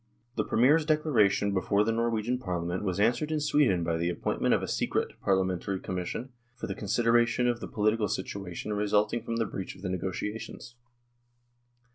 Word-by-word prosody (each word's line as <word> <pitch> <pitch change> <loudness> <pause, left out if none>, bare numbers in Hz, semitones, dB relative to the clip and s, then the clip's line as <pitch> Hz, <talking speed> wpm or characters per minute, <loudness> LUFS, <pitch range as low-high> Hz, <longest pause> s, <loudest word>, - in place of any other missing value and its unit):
The 110 - +1
Premier's 140 +10 +4
declaration 145 -10 +2
before 100 +2 +2
the 115 - +1
Norwegian 115 +1 0
Parliament 90 -5 -3
was 95 -1 -1
answered 120 +9 +2
in 155 - +1
Sweden 140 - +2
by 85 0 0
the 85 +1 0
appoint 90 - -2
ment - - +3
of - - -2
a - - -2
"secret" - - -1
Parliamentary 95 0 0
Commission 95 +8 -4 0.3
for 125 - -6
the - - -3
consideration 120 +3 +2
of 120 -1 0
the - - -6
political 110 0 +1
situation 95 +1 -4
resulting 105 +2 +1
from 115 0 -4
the 115 0 +1
breach 95 -2 -6
of 95 - -15
the 95 - -2
negotiations. 105 +6 -4
105 Hz, 170 wpm, -29 LUFS, 95-120 Hz, 0.3 s, Premier's